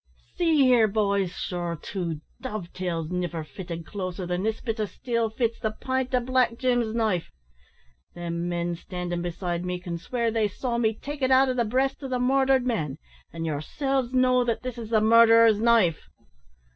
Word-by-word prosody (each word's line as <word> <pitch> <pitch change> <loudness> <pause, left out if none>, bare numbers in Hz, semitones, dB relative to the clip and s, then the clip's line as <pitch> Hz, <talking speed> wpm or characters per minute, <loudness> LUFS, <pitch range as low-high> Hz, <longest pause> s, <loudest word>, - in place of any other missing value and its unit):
"See 325 -5 +3
here, 245 -4 +5
boys, 200 -2 +1
sure 175 -2 -3
two 170 -6 -4 0.2
dovetails 180 -8 -4
niver 175 -3 -2
fitted 165 +3 -7
closer 185 -2 -5
than 180 +1 -2
this 220 +2 -1
bit 225 -2 -4
o' 215 - +1
steel 230 +1 -2
fits 230 +1 -1
the 220 - 0
pint 260 0 -1
o' - - +4
Black 245 -1 +1
Jim's 245 -3 +1
knife. 215 -7 0 0.9
Them 170 0 -3
men 175 0 -1
standin' 175 0 -4
beside 175 0 -3
me 180 0 -3
can 175 -2 -5
swear 235 +6 -1
they 220 -1 +1
saw 235 +4 -3
me 220 -2 +1
take 290 +4 -7
it 260 - +2
out 265 0 +5
o' - - +1
the 240 -2 +1
breast 265 +6 0
o' - - -3
the 255 -1 -1
morthered 265 0 +3
man, 155 - -1 0.3
an' 165 0 -5
yerselves 250 - -1
know 255 -1 +3
that 235 0 -2
this 250 -1 -5
is 225 -2 -7
the 220 -2 +3
murderer's 230 -1 +6
knife." 225 -8 +3
220 Hz, 180 wpm, -26 LUFS, 175-250 Hz, 0.9 s, murderer's